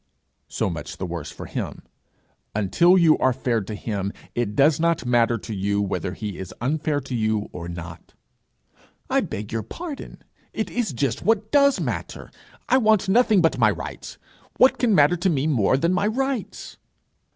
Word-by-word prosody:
'So - - -2
much - - -6
the 95 - -4
worse 85 -3 -5
for - - -9
him. - - -5 0.7
Until 170 - +4
you 165 -3 +5
are 130 - +3
fair 120 -3 -1
to 105 +2 -6
him, 100 -2 -3 0.2
it 115 -4 -2
does 145 +2 +4
not 170 -3 +1
matter 120 -1 +2
to 110 - -7
you 100 +1 -1
whether 95 -2 -2
he 105 -4 -6
is 95 -2 -8
unfair 150 +3 0
to 130 - -8
you 110 -2 0
or 85 -1 -7
not.' 85 -1 -9 1.0
'I - - +3
beg 105 +1 -6
your 115 -1 -1
pardon 295 - -8 0.3
it 220 - -3
is 235 -8 -1
just 130 -2 -1
what 215 +2 +1
does 280 -1 +4
matter! - - -5 0.4
I 260 - +4
want 215 -5 +3
nothing 220 -2 +4
but 165 - +2
my - - +5
rights. - - -6 0.4
What 255 - +5
can 230 -5 +3
matter 150 +3 +5
to 185 +3 +1
me 145 -4 0
more 130 -5 +2
than 170 +6 +1
my 195 +3 +1
rights?' 250 -3 -3
135 Hz, 175 wpm, -23 LUFS, -, 1.0 s, you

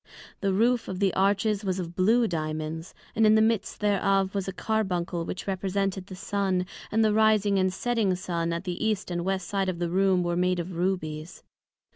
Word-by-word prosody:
The 200 -2 0
roof 230 +5 +2
of 185 - -4
the 195 -1 +1
Arches 200 +2 +1
was 190 -2 -1
of 175 -2 -5
blew 225 +5 +3
Diamonds, 155 0 -4 0.2
and 225 - +3
in 215 0 +6
the - - +5
midst 220 -2 0
thereof 195 -1 +2
was 195 -2 -2
a - - -1
Carbuncle, 180 -5 -1
which 185 - -5
represented 195 0 -2
the 185 - -8
Sun; 190 -1 -1 0.3
and 220 +1 +3
the 215 - +3
Rising 215 -2 +3
and 185 0 +2
Setting 220 -2 0
Sun 170 -2 -2
at 170 +2 -3
the 180 0 -4
East 215 -4 -1
and 175 0 -2
West 190 -1 -2
side 195 0 0
of 180 - -3
the 170 -1 -2
Room 190 -1 +3
were 175 0 -1
made 180 +1 +1
of 175 +1 -4
Rubies. 165 -3 -3
190 Hz, 200 wpm, -27 LUFS, 180-205 Hz, 0.3 s, in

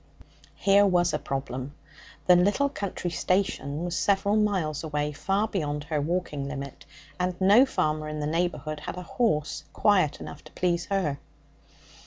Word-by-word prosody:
Here 200 -1 +4
was 180 -3 +3
a - - 0
problem. 135 0 -4 0.5
The 180 - +7
little 205 +11 +3
country 200 -8 -4
station 175 -5 -1
was 175 - -3
several 200 +1 +2
miles 190 -9 0
away, 150 -1 -1
far 195 +8 0
beyond 150 -8 -2
her 150 -1 -1
walking 150 -3 -2
limit, 140 -1 -7 0.3
and 180 0 -1
no 205 +8 +6
farmer 155 -8 -1
in 155 0 -4
the 150 - -2
neighbourhood 155 -2 -1
had 150 - -6
a 180 - -5
horse 165 -6 0
quiet 185 -8 +3
enough 145 - -9
to - - -13
please 175 -2 0
her. 175 -8 -1
175 Hz, 155 wpm, -27 LUFS, 150-195 Hz, 0.5 s, The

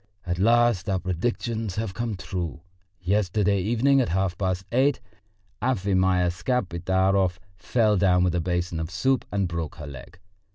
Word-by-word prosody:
At 90 0 -2
last 115 -2 +3
our 95 - +1
predictions 110 +3 -2
have 110 -3 -3
come 115 +1 -3
true: 90 -3 -5 0.4
yesterday 100 +1 +1
evening 120 +7 +3
at 120 - -1
half 95 0 0
past 95 0 -2
eight 130 +3 +2 0.6
Afimya 95 -6 +2
Skapidarov 95 -3 0 0.2
fell 105 +2 +1
down 90 -2 +3
with 90 -1 +1
a 90 - 0
basin 90 -1 -2
of 80 0 -3
soup 125 +8 0
and 100 -2 0
broke 85 -3 -4
her 75 - -8
leg. 70 +6 -10
95 Hz, 150 wpm, -25 LUFS, 90-110 Hz, 0.6 s, last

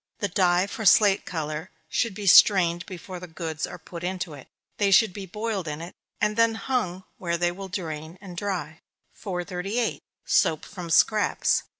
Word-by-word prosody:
The 205 - -2
dye 180 -1 +3
for 220 +2 -6
slate 200 0 +5
color 155 +1 -4 0.2
should 230 -5 -1
be 205 - -6
strained 175 -2 +6
before 185 -1 -8
the 180 - -9
goods 160 -2 -4
are - - -8
put 170 -1 -10
into 180 -2 -3
it. 140 -3 -12 0.3
They 205 -3 +2
should 195 0 +5
be 195 -1 -7
boiled 210 -2 -3
in 150 0 -4
it, 170 +2 -8 0.3
and 210 - +1
then 230 0 +3
hung 220 -7 -2 0.2
where 170 -2 -1
they 175 0 +1
will 195 +2 -7
drain 160 -3 -5
and 190 -3 -10
dry. 170 -5 -4 0.3
438. 195 +4 -3 0.2
_Soap 155 - +2
from 180 -4 -8
Scraps. 210 +5 +3
185 Hz, 175 wpm, -26 LUFS, 170-205 Hz, 0.3 s, strained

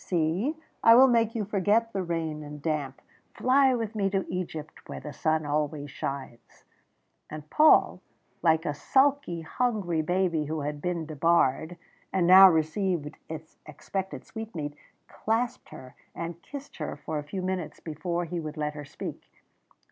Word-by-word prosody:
"See, 180 - 0 0.3
I 230 - +8
will 260 +2 +9
make 230 -2 +2
you 215 -3 -1
forget 210 +3 +1
the 195 - -1
rain 165 -3 -3
and 150 0 -8
damp. 145 -3 -2 0.4
Fly 260 0 +4
with 225 -2 -3
me 200 -3 0
to 195 -1 -1
Egypt 160 -4 -6
where - - -5
the 150 - -8
sun 155 -1 0
always 145 -1 -2
shines." 135 -4 -7 0.6
And 155 0 -8
Paul, 310 +1 +5 0.4
like 160 -1 +3
a 150 - 0
sulky, 265 - +2
hungry 185 -3 -1
baby, 175 -1 0
who 155 +1 -3
had 145 0 -4
been 175 -1 -2
debarred, 160 +1 +1 0.3
and 185 -2 +2
now 190 +2 +10
received 160 -1 0
its 160 0 -9
expected 190 +6 -5
sweetmeat, 170 -10 -6 0.3
clasped 230 +3 -2
her 130 0 -11 0.2
and 170 0 -6
kissed 285 0 -10
her 150 -3 -4
for 150 +1 -4
a - - -6
few 185 +6 -5
minutes 185 -3 -3
before 170 +2 -3
he 170 +1 -4
would 155 -1 -6
let 150 0 -2
her 150 -1 -8
speak. - - -7
170 Hz, 155 wpm, -27 LUFS, 150-195 Hz, 0.6 s, now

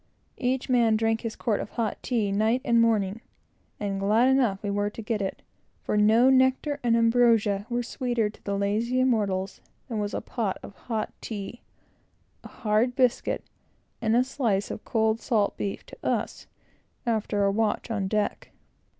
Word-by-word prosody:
Each 255 0 0
man 235 -4 +3
drank 225 0 +1
his 230 -1 -4
quart 215 -4 -1
of - - -5
hot 230 -3 -2
tea 220 -5 0
night 220 +5 +2
and 235 -1 +4
morning; 220 -2 +1 0.6
and 200 -1 -2
glad 215 +6 +3
enough 240 -8 +2
we 205 - -1
were 205 0 0
to 215 - -8
get 215 -1 -1
it, 195 - -4 0.4
for - - -1
no 220 +5 +5
nectar 260 +3 +2
and 235 -1 +3
ambrosia 230 -3 +3
were 240 0 -1
sweeter 240 -2 -1
to 210 - -12
the 200 -1 -2
lazy 220 +5 0
immortals, 205 -7 0 0.3
than 230 -4 -3
was 205 0 -2
a - - -1
pot 220 -6 -2
of - - -9
hot 225 -3 -4
tea, 215 +2 -6 0.8
a - - -9
hard 230 +1 0
biscuit, 255 -2 +1 0.6
and 220 0 +2
a 245 - +5
slice 235 -7 -1
of - - -7
cold 220 -1 +1
salt 215 -6 +1
beef, 200 - -4
to - - -13
us - - -2 0.6
after 220 -3 0
a 200 - +3
watch 220 +2 -1
on 200 -4 -1
deck. 210 +1 -1
225 Hz, 170 wpm, -26 LUFS, 205-240 Hz, 0.8 s, no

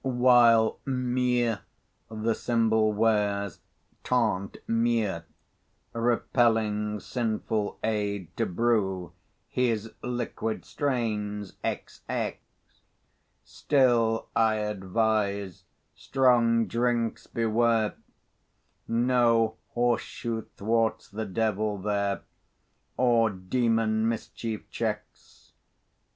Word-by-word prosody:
While 120 -3 +5
Meux 125 -3 0 0.5
the 110 +1 -1
symbol 110 -2 +2
wears, 105 -2 +1 0.4
tant 110 -6 0
mieux, 115 -6 +1 0.7
Repelling 110 -3 +1
sinful 110 -2 -2
aid 100 -5 -2
to 115 - 0
brew 95 -4 0 0.3
His 115 -3 -1
liquid 120 -2 -3
strains 105 -7 -2
XX; - - -3 1.1
Still, 120 -5 +2
I 110 -1 +3
advise, 105 -1 -1 0.3
strong 120 -3 +3
drinks 120 -1 -1
beware, 115 -1 +1 0.9
No 115 -2 +2 0.2
horse 120 -1 +2
shoe 115 -2 -5
thwarts 115 +2 0
the 110 +2 -4
devil 105 +1 0
there, 100 0 -1 0.8
Or 120 -3 +4
demon 110 +3 +1
mischief 115 -1 -5
checks. 105 -2 -5
115 Hz, 75 wpm, -27 LUFS, 105-120 Hz, 1.1 s, While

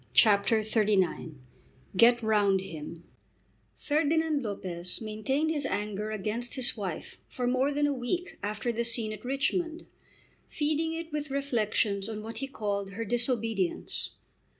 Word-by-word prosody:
CHAPTER 215 0 +5
XXXIX 205 -7 +1 0.6
"Get 235 +4 +6
Round 205 -3 +4
Him" 165 -2 -7 0.7
Ferdinand 310 0 +1
Lopez 185 -5 -2
maintained 250 +8 0
his 295 -2 0
anger 210 -3 -2
against 215 +4 -2
his 260 -3 +4
wife 190 -7 -5
for 250 - -3
more 255 +3 +2
than 290 +1 +2
a 290 - +2
week 345 +9 -3
after 215 +3 -1
the 235 +1 -1
scene 230 -2 -1
at 215 - -9
Richmond, 315 +6 -1 0.6
feeding 310 +2 0
it 330 0 -5
with 300 0 -2
reflections 220 -7 0
on 215 -1 -5
what 225 +1 -5
he 270 - -2
called 200 -6 -3
her 230 +3 -3
disobedience. 225 -5 0
230 Hz, 135 wpm, -29 LUFS, 205-275 Hz, 0.7 s, Get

